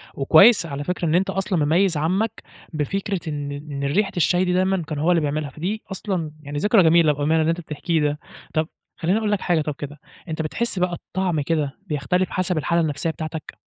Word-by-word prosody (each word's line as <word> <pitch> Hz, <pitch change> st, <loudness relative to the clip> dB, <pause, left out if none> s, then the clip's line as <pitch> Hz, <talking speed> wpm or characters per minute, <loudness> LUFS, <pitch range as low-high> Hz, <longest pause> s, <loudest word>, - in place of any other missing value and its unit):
وكويس 170 Hz, -, +6 dB
على 145 Hz, -3 st, -5 dB
فكرة 180 Hz, +3 st, -2 dB
إن 160 Hz, -, +2 dB
أنت 185 Hz, +2 st, +2 dB
أصلًا 190 Hz, -5 st, 0 dB
مميز 170 Hz, +2 st, +2 dB
عمك، 190 Hz, +9 st, -1 dB, 0.3 s
بفكرة 195 Hz, +6 st, -2 dB
إن 145 Hz, -1 st, -4 dB
إن 145 Hz, -1 st, -6 dB
ريحة 195 Hz, +9 st, +1 dB
الشاي 175 Hz, +2 st, +3 dB
دي 180 Hz, -, 0 dB
دايمًا 185 Hz, 0 st, +1 dB
كان 155 Hz, -2 st, -4 dB
هو 160 Hz, +4 st, +2 dB
اللي 170 Hz, -2 st, +3 dB
بيعملها، 150 Hz, 0 st, -2 dB
فدي 185 Hz, +10 st, -4 dB
أصلًا 185 Hz, -5 st, -3 dB
يعني 145 Hz, 0 st, -6 dB
ذكرى 205 Hz, +5 st, +4 dB
جميلة 165 Hz, -1 st, +5 dB
بأمانة 150 Hz, +3 st, +1 dB
اللى 160 Hz, -, +1 dB
أنت 165 Hz, +1 st, -1 dB
بتحكيه 160 Hz, +1 st, -1 dB
ده. 150 Hz, 0 st, 0 dB, 0.3 s
طب، 155 Hz, 0 st, +1 dB, 0.3 s
خليني 180 Hz, +5 st, +1 dB
أقول 215 Hz, -2 st, 0 dB
لك 205 Hz, -, 0 dB
حاجة 170 Hz, -3 st, +2 dB
طب 150 Hz, -1 st, -3 dB
كده، 145 Hz, 0 st, -7 dB, 0.3 s
أنتَ 160 Hz, -1 st, -3 dB
بتحس 195 Hz, +6 st, -2 dB
بقى 180 Hz, 0 st, +1 dB
الطعم 175 Hz, -2 st, -2 dB
كده، 145 Hz, -2 st, -1 dB
بيختلف 175 Hz, +4 st, 0 dB
حسب 185 Hz, -2 st, -1 dB
الحالة 170 Hz, +3 st, +1 dB
النفسية 155 Hz, 0 st, -1 dB
بتاعتك؟ 160 Hz, -1 st, -6 dB
165 Hz, 200 wpm, -22 LUFS, 150-185 Hz, 0.3 s, وكويس